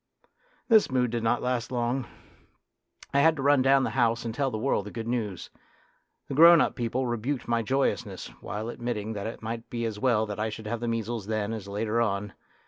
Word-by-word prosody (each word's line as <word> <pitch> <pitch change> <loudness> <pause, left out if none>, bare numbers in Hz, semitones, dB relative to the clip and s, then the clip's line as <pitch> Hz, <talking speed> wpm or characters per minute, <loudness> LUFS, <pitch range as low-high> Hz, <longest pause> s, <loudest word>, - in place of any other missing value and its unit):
This 220 -3 +5
mood 125 -3 +1
did 120 -1 -1
not 115 +2 +1
last 125 0 -1
long. 120 +1 -1 1.1
I 140 - +4
had 160 +2 +5
to 135 - -4
run 145 -1 +5
down 135 +1 +4
the - - -1
house 120 -2 +1
and 115 - -3
tell 135 +3 0
the 110 - -4
world 110 -4 0
the - - -7
good 115 -1 -5
news. 110 -6 -3 0.8
The - - -5
grown 165 +3 +8
up - - +2
people 125 +2 -2
rebuked 120 +3 -2
my 115 -1 +1
joyousness, 120 -5 -1
while 110 +3 -5
admitting 115 -3 -4
that 100 0 -4
it 115 - -8
might 115 +1 -5
be 115 -1 -3
as 110 -2 -4
well 115 -3 +2
that 105 -1 -6
I 110 +1 0
should 110 0 -8
have 115 +2 -3
the 120 - -3
measles 115 -2 -3
then 110 0 -1
as 105 -3 -6
later 105 +3 -1
on. 105 -2 -1
115 Hz, 215 wpm, -27 LUFS, 110-130 Hz, 1.1 s, grown